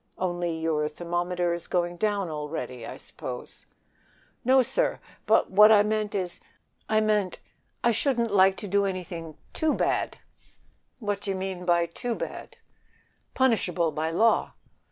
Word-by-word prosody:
Only 175 -2 -1
your 155 -2 0
thermometer 175 +2 -1
is 170 - -6
going 175 -1 -1
down 205 -1 0
already, 150 -6 -5
I - - -7
suppose." - - -9 0.8
"No, 260 +1 +5
sir; - - 0 0.3
but - - +3
what 210 +3 +8
I 205 -1 +7
mean 215 0 0
is, 185 -3 -3 0.5
I 215 +1 0
shouldn't 235 -1 +1
like 190 -1 +5
to 205 - -5
do 200 +1 +2
anything 175 -4 -5 0.2
too 315 -1 +1
bad." - - 0 0.8
"What 205 -4 -3
d'ye 195 -1 -2
mean 190 -1 -4
by 170 -1 +3
too 230 +8 -4
bad?" - - -7 0.8
"Punishable 185 -10 +2
by 155 +2 -2
law." 220 +8 +2
185 Hz, 135 wpm, -27 LUFS, 170-215 Hz, 0.8 s, what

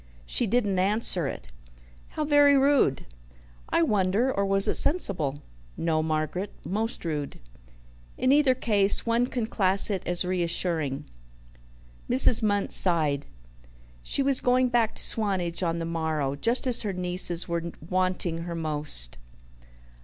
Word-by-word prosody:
She 220 - -2
didn't 205 -4 0
answer 190 -4 +1
it." - - -8 0.6
"How 305 - -3
very 290 -1 +4
rude!" 270 - +1 0.6
"I 170 - +1
wonder. 205 +7 0
Or 200 0 -1
was 195 0 +7
it - - +1
sensible?" 175 - 0 0.3
"No, 160 -1 -1
Margaret, 160 +5 -3
most 215 +1 -3
rude." 150 -3 -4 0.8
"In 255 +1 +1
either 280 -2 +3
case 205 -5 +1
one 235 +1 +1
can 245 -3 -3
class 195 -2 +2
it 190 -3 -2
as 175 +1 -1
reassuring." 170 -5 -1 1.0
Mrs. 250 -2 +5
Munt 205 -2 -1
sighed. 155 -6 +3 0.7
She 275 - -2
was 275 -1 +1
going 250 0 +2
back 235 -3 0
to - - 0
Swanage 190 -6 0
on 170 -2 -1
the 165 - -4
morrow, 160 -4 -3
just 230 - -1
as 245 -2 +1
her 205 -3 -3
nieces 180 -1 0
were 170 -1 -2 0.3
wanting 185 -2 -1
her 170 -1 -6
most. 150 - -2
185 Hz, 140 wpm, -25 LUFS, 165-230 Hz, 1.0 s, was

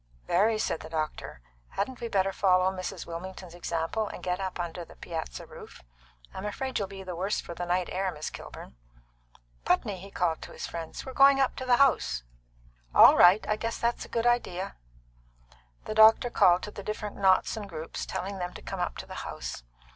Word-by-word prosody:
"Very," 215 +5 +3
said 215 -6 -1
the 160 - -9
doctor. 155 - -4 0.3
"Hadn't 235 +6 -3
we 235 - -2
better 195 -3 +1
follow 185 -1 +3
Mrs. 185 -1 -5
Wilmington's 180 +1 -7
example, 175 +5 -2
and - - -8
get 180 0 -1
up 190 -2 -4
under 175 0 -4
the - - -15
piazza 160 - -6
roof? - - -13 0.5
I'm 190 - -6
afraid 255 +5 -3
you'll 200 - -2
be 195 0 -9
the 180 -2 -6
worse 190 +4 -1
for - - -7
the 175 +1 -5
night 180 0 +1
air, 190 0 -1
Miss 150 -2 -6
Kilburn. 65 - -10 0.9
Putney," 190 +1 +1
he 195 +2 -10
called 175 -4 -1
to - - -9
his - - -5
friend, 165 -1 -6
"we're 265 - -7
going 275 +1 +6
up 270 - +2
to 260 - -4
the 245 -1 +5
house." 140 - +3 0.7
"All - - +9
right. 180 +5 +6
I 215 - +2
guess 230 +1 -3
that's 235 0 -1
a - - -11
good 230 0 -1
idea." 200 -6 0 1.1
The - - -3
doctor 220 +2 +6
called 180 -4 +5
to 210 - -5
the 200 - -8
different 210 0 -5
knots 190 +1 +3
and 210 -2 -6
groups, 160 -2 -6
telling 190 +1 -4
them 180 0 -4
to - - -8
come - - -5
up - - -2
to - - -6
the - - -10
house. - - -6
190 Hz, 200 wpm, -28 LUFS, 175-215 Hz, 1.1 s, All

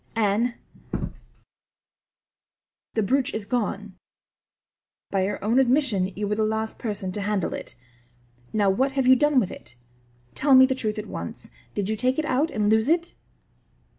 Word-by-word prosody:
"Anne, 225 +2 +1 2.4
the 220 - +2
brooch 260 +5 +1
is 220 -2 -3
gone. 210 -3 -3 1.1
By 190 -1 +1
your 205 - -2
own 230 +5 +3
admission 250 -7 +2
you 205 0 -2
were 210 - 0
the 215 +1 0
last 220 +1 -2
person 205 -4 -3
to 205 - -4
handle 205 -3 -1
it. - - -7 0.8
Now, 205 -3 +2
what 265 +7 +1
have 270 -1 +1
you 260 +1 +7
done 295 +1 +3
with 200 - -1
it? 125 - -11 0.6
Tell 275 -1 +4
me 260 0 +9
the 265 - 0
truth 220 -4 -2
at 210 - -4
once. - - -7 0.2
Did 200 -2 -1
you 220 - 0
take 255 +4 0
it 315 - 0
out 290 +3 +1
and 210 -6 0
lose 220 +4 +3
it?" 340 +1 +1
220 Hz, 165 wpm, -25 LUFS, 205-260 Hz, 2.4 s, me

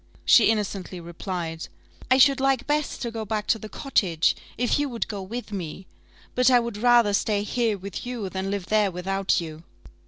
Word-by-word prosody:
She 235 - +6
innocently 200 -4 -2
replied, 170 -1 -5 0.4
"I 260 - +5
should 275 0 +5
like 270 -2 +1
best 295 -2 -1
to 235 - -3
go 225 -1 -4
back 215 0 -2
to 225 - +3
the 215 - -8
cottage, 185 - +1 0.2
if 245 +3 +1
you 290 -1 0
would 235 -2 -3
go 205 -3 -5
with 225 +4 -6
me 185 -1 -6 0.5
but 250 0 +4
I 250 -1 +6
would 235 -3 -4
rather 235 -2 +4
stay 205 0 +1
here 225 -1 0
with 195 0 -7
you 245 -5 -4
than 190 +1 -4
live 200 -2 -3
there 210 +1 +2
without 190 +2 0
you." 160 -2 -7
210 Hz, 190 wpm, -25 LUFS, 190-240 Hz, 0.5 s, She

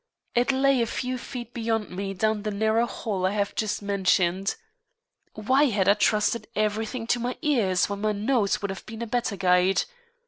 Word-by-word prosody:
It 245 +3 +2
lay 270 -1 +3
a 230 - +1
few 255 +2 -3
feet 240 -1 -7
beyond 225 -2 -2
me 195 +2 -4
down 215 +2 0
the 215 - -3
narrow 220 +3 +1
hall 200 -6 -4
I 190 +2 +1
have 200 -1 -1
just 210 -1 -2
mentioned. 190 -1 +1 0.8
Why 260 +7 +3
had 205 -8 +1
I 200 - +7
trusted 215 +2 +1
everything 220 +3 -1
to 240 +1 +1
my 245 +1 -3
ears 220 - +2
when 200 0 -5
my 215 0 +1
nose 210 -1 0
would 200 - -1
have 195 - -9
been 225 +1 -6
a - - -2
better 230 -2 -1
guide? 180 0 +3
215 Hz, 185 wpm, -26 LUFS, 200-235 Hz, 0.8 s, I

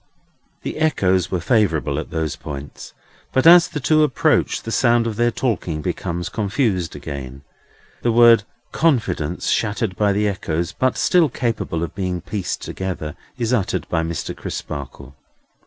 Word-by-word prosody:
The - - -4
echoes 95 - +2
were 90 - -1
favourable 85 - +1
at - - -6
those 80 -2 -2
points, 70 -2 -8 0.4
but 130 - +1
as 170 0 +9
the 150 - -5
two 155 +4 +3
approach, 150 -5 +2
the 115 - -5
sound 120 -1 +3
of 115 -2 -2
their 120 +2 +2
talking 95 -10 -2
becomes 85 +3 -3
confused 100 - -1
again. 70 -1 -7 0.6
The 120 - +2
word 115 -1 +7 0.3
"confidence," 105 - 0
shattered 105 -2 0
by 105 +1 +2
the 105 +1 +1
echoes, 85 -4 -2
but 130 0 0
still 175 -4 +3
capable 115 -9 -2
of 85 - -5
being 90 -2 -2
pieced 90 +2 -4
together, 90 -5 -4 0.2
is 120 +1 -1
uttered 100 -6 0
by 80 - +1
Mr. 80 0 -4
Crisparkle. 70 -2 -7
95 Hz, 150 wpm, -21 LUFS, 80-120 Hz, 0.6 s, as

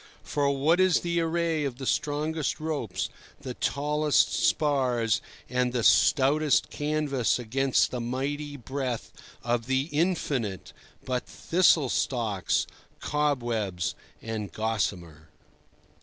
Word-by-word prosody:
For 145 -1 0
what 145 +5 +2
is 185 -2 +4
the 170 0 0
array 165 -1 0
of 135 -4 -3
the 135 - -6
strongest 150 +2 -1
ropes, 115 - -2 0.3
the 130 -3 -5
tallest 150 +3 +1
spars 125 -7 +1 0.3
and 125 0 0
the 120 -2 0
stoutest 145 +4 +4
canvas 145 -4 0
against 130 +3 +1
the 125 - -3
mighty 140 +4 -3
breath 130 -1 -4 0.3
of 120 0 -1
the 135 +3 0
infinite, 145 - -1 0.3
but 125 -1 -2
thistle 165 -5 +3
stalks, 110 -9 0 0.3
cobwebs 120 -11 -1 0.3
and 110 -4 -4
gossamer? 90 -8 -3
135 Hz, 110 wpm, -27 LUFS, 115-150 Hz, 0.3 s, is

